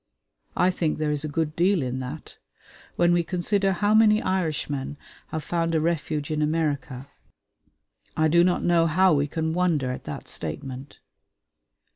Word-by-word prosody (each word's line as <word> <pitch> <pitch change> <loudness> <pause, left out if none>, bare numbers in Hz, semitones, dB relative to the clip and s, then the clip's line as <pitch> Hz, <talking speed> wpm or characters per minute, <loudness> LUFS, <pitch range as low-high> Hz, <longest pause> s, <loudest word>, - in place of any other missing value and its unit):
I 180 +1 +4
think 165 -4 -1
there 155 -1 -1
is 145 -1 -2
a - - -2
good 155 0 -2
deal 180 -2 +2
in 130 0 -3
that. 135 +4 -8 0.6
When 175 0 +3
we 175 0 +2
consider 195 +3 0
how 205 +3 +1
many 215 -1 +5
Irishmen 155 -8 -2 0.3
have 160 -1 -5
found 165 0 -1
a - - +3
refuge 155 -2 -2
in 155 0 -1
America, 145 -4 -1 1.1
I 155 0 +3
do 170 +2 +4
not 180 0 +1
know 170 -1 +3
how 185 +3 +4
we 145 0 +1
can 160 +2 -2
wonder 165 -7 +1
at 125 - -7
that 75 - -7
statement. 130 - -7
160 Hz, 160 wpm, -25 LUFS, 145-175 Hz, 1.1 s, many